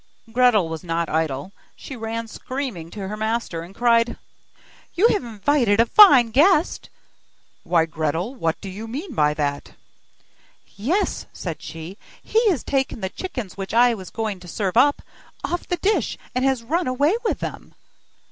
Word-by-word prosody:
Gretel 235 -6 +4
was 160 +1 -6
not 165 -1 -2
idle; 155 +1 -1 0.2
she 270 - -9
ran 225 0 -4
screaming 240 - -5
to 195 +1 -6
her 210 - -4
master, 220 -5 -2
and 175 +4 -11
cried: 235 -1 +2 0.8
'You 415 +7 +5
have 410 - +1
invited 230 -1 +1
a 230 - +6
fine 260 - +7
guest!' 315 - +3 0.7
'Why, 165 -1 +2
Gretel? 160 - -2
What 165 -11 -2
do 200 - -7
you 210 +4 -7
mean 290 - -6
by 150 -6 +2
that?' 145 -2 -3 1.0
'Yes,' 305 - -1
said 165 -4 -6
she, 165 +5 -8 0.2
'he 450 0 +2
has 330 -10 0
taken 270 -4 -1
the 190 - -2
chickens 245 - -6
which 195 +2 -5
I 240 +1 +5
was 190 -5 -8
just - - -14
going 215 -4 -2
to 180 - -13
serve 190 +1 -2
up, 285 +4 +4 0.4
off 350 - -3
the 355 - -1
dish, 405 +5 0 0.2
and 255 0 0
has 265 -3 +1
run 330 +8 -1
away 285 - +2
with 450 - 0
them! - - -7
225 Hz, 165 wpm, -22 LUFS, 180-270 Hz, 1.0 s, fine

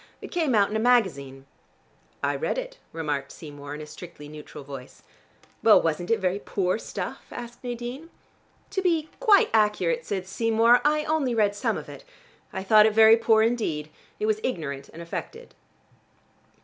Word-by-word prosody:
It - - -10
came 320 -8 +1
out 205 -1 +3
in - - -3
a - - +1
magazine." 165 - +1 0.8
"I - - +1
read - - -2
it," - - -6
remarked 145 -4 -3
Seymour 145 -2 -9
in 150 - -8
a - - -7
strictly 150 -1 -11
neutral 150 -1 -10
voice. 135 -2 -10 0.6
"Well, - - +7
wasn't 165 +2 -2
it 230 - +3
very 190 +1 0
poor 190 0 -1
stuff?" - - -6
asked 240 0 -9
Nadine. 245 +6 -6 0.6
"To 385 - -1
be 330 -4 +1
quite 430 -5 +5
accurate," 220 - +2
said 190 -2 -3
Seymour, 230 +4 +3
"I 300 +1 +2
only 300 -6 0
read 210 -2 +2
some 205 - -1
of - - -8
it. - - -11 0.5
I 190 - -5
thought 215 +2 +6
it 220 - 0
very 220 0 +8
poor 225 -1 +3
indeed. 170 -11 -1 0.3
If 210 - -1
was 215 0 +1
ignorant 140 - -4
and 170 - -10
affected." 460 - -7
215 Hz, 170 wpm, -25 LUFS, 160-245 Hz, 0.8 s, very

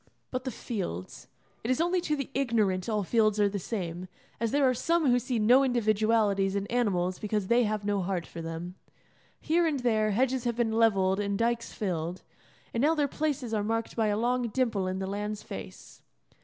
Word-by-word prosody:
But 255 0 -3
the - - -1
fields. 185 - -5 0.4
It 225 - -3
is 255 - +2
only 350 +2 +2
to 305 -3 0
the 275 -1 -5
ignorant 220 -8 +1
all 210 -2 0
fields 215 +1 +2
are 205 - +5
the 200 0 -3
same; 180 -3 -4 0.3
as 230 0 0
there 280 +2 +3
are 255 - +3
some 335 +6 +1
who 245 -1 +4
see 245 0 -2
no 245 +5 +5
individualities 215 -5 +2
in 200 0 -1
animals 185 -7 0
because 210 -2 -2
they 235 0 +4
have 210 -1 -2
no 205 -1 +1
heart 180 -2 -2
for 170 - -8
them. 165 +2 -5 0.7
Here 335 +2 +2
and 290 -5 -1
there 220 -3 +2
hedges 255 +4 +1
have 240 -1 0
been 235 -2 +1
levelled 200 -4 +3
and 200 -1 -1
dykes 235 +1 0
filled, 175 -3 -3 0.5
and 230 - 0
now 310 +4 +4
their 295 -2 +2
places 280 -5 -2
are 210 -2 +1
marked 225 +1 -2
by 225 -2 +1
a 205 0 +1
long 245 +2 +1
dimple 220 -5 0
in 185 0 -2
the 190 - -3
land's 205 +2 -4
face. 95 - -9
220 Hz, 200 wpm, -29 LUFS, 195-245 Hz, 0.7 s, are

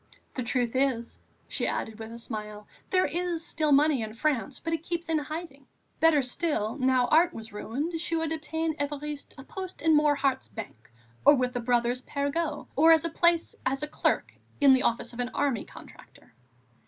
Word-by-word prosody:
"The 255 - -3
truth 245 0 -1
is," 255 -3 0 0.3
she - - -1
added, 220 0 -3
with 220 0 -7
a 230 - -8
smile, 210 -2 -6 0.2
"there 370 0 +3
is 340 +1 -2
still 310 -2 0
money 285 -2 +4
in 220 0 -5
France, 275 0 -1
but 330 0 -3
it 325 - -1
keeps 340 0 -4
in 320 -1 +2
hiding." 295 -2 -7 0.3
Better 320 -3 +5
still, 250 -4 -1
now 255 -1 +3
Art 340 +3 +4
was 220 -1 -8
ruined, 290 +11 -3
she 335 - -1
would 325 -1 -1
obtain 320 0 -2
Évariste 290 0 -4
a 270 - -9
post 375 +5 -7
in 320 -1 +5
Morhardt's 285 -3 +2
bank 225 - -9 0.3
or 290 - +8
with 250 -1 0
the 245 - -1
Brothers 240 +1 +1
Perregaux, 290 +3 -2
or 320 +4 +6
a - - +7
place 340 0 +2
as 270 +2 -1
clerk - - 0 0.3
in 285 -2 +7
the 260 -1 +5
office 235 0 0
of 235 - -10
an 245 0 -1
army 265 -7 0
contractor. - - -15
285 Hz, 180 wpm, -28 LUFS, 245-320 Hz, 0.3 s, or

